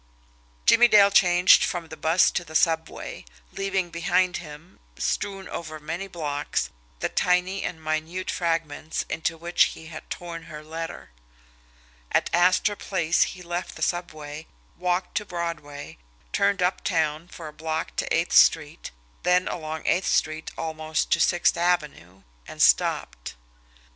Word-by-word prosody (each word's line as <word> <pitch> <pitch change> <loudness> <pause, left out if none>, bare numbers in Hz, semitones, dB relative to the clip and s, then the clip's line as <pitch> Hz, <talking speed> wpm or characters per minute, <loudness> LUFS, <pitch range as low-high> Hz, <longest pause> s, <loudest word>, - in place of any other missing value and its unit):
Jimmie 240 - +7
Dale 200 -3 +6
changed 180 -2 +6
from 170 -2 -3
the 160 - -7
bus 160 +3 +3
to 175 - -2
the 160 -2 -12
subway, 160 0 0 0.3
leaving 195 -3 -2
behind 180 +2 +1
him, 155 +1 -12 0.2
strewn 195 -1 -2
over 155 -2 -6
many 165 +6 -5
blocks, 150 -5 -3 0.3
the - - +1
tiny 180 +2 +1
and 170 - -4
minute 160 +4 -3
fragments 165 -2 -2
into 165 0 -2
which 170 +2 +3
he 160 0 -11
had 155 - -9
torn 170 -2 -6
her 155 -2 -9
letter; 165 - -7 1.0
at - - +1
Astor 185 +4 +3
Place 175 -5 0 0.2
he 180 - -11
left 175 +1 -4
the - - -4
subway, 155 -3 -4 0.3
walked 180 +1 -1
to 210 - 0
Broadway, 165 - -6 0.3
turned 200 -2 +2
uptown 165 -3 0
for 165 -2 -9
a 150 - -9
block 160 +1 -4
to - - -2
Eighth - - +1
Street, - - +4 0.3
then 180 +1 +2
along 155 -1 -5
Eighth 185 - +1
Street 155 0 0
almost 155 -1 -2
to 170 - +4
Sixth 175 +1 +3
Avenue 150 - -1 0.2
and - - -10
stopped. - - +2
170 Hz, 140 wpm, -25 LUFS, 155-180 Hz, 1.0 s, Jimmie